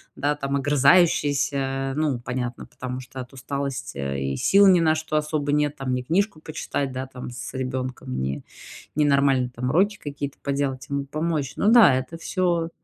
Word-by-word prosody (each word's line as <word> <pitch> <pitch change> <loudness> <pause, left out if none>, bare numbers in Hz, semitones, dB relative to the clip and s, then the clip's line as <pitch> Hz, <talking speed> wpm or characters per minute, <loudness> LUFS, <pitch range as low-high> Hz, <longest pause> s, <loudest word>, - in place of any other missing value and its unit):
да, 145 +1 0
там 140 -1 -2
огрызающаяся. 140 -2 +2
Ну, 150 -5 0
понятно, 125 -1 -4
потому 130 0 -6
что 130 +1 -10
от 125 +1 -8
усталости 135 - -4 0.2
и - - -3
сил 200 - +5
ни 180 -2 +6
на 160 -1 +3
что 155 0 -3
особо 150 -1 0
нет. 150 0 +1
Там 130 -2 -2
ни 125 - 0
книжку 170 - 0
почитать, 145 -3 -3
да, 130 +1 -4
там 125 -1 -8
с 120 -1 -7
ребенком 130 - -4
ни 65 +1 -3 0.5
ни 150 -1 +3
нормально, 140 -3 +3
там 125 +2 -2
уроки 200 +7 +2
какие-то 140 -1 -5
поделать, 140 -2 -2
ему 140 0 -2
помочь. 155 -1 -2
Ну 205 - +1
да, 230 - +8
это 130 +6 -4
всё 170 -2 0
140 Hz, 175 wpm, -24 LUFS, 130-155 Hz, 0.5 s, да